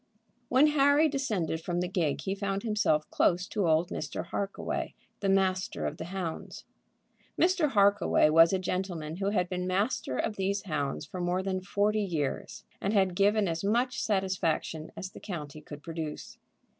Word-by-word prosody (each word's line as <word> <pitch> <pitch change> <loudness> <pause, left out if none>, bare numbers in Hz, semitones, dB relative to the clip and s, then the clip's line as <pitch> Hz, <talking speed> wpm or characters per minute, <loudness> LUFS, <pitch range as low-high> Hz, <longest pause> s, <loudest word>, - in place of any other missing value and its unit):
When 260 +4 +5
Harry 295 +1 +4
descended 215 - -1
from 175 +1 -2
the 180 - 0
gig 165 -6 0
he 190 +5 -2
found 195 0 -2
himself 210 -9 +1
close 180 +1 +2
to 200 -5 0
old 160 +3 +3
Mr. - - -4
Harkaway, 200 -1 -3 0.2
the 200 - 0
master 190 0 +1
of - - -3
the - - -5
hounds. 175 -2 -5 0.7
Mr. 350 -3 +3
Harkaway 200 -6 +4
was 165 +1 +7
a 190 - +2
gentleman 180 -4 -3
who 195 +1 0
had 190 -3 +1
been 180 0 -3
master 185 - 0
of 220 -2 -2
these 195 +1 -1
hounds 150 -4 -2
for 180 +4 -6
more 180 +1 0
than 190 -1 -2
forty 205 +3 +1
years, 160 -8 -3 0.2
and 200 - 0
had 190 -3 +3
given 205 +2 +3
as 165 0 -2
much 240 +5 +1
satisfaction 185 -6 -1
as 185 - -5
the - - -11
county 155 -6 -6
could 145 -1 -10
produce. 160 -2 -6
190 Hz, 170 wpm, -29 LUFS, 165-205 Hz, 0.7 s, was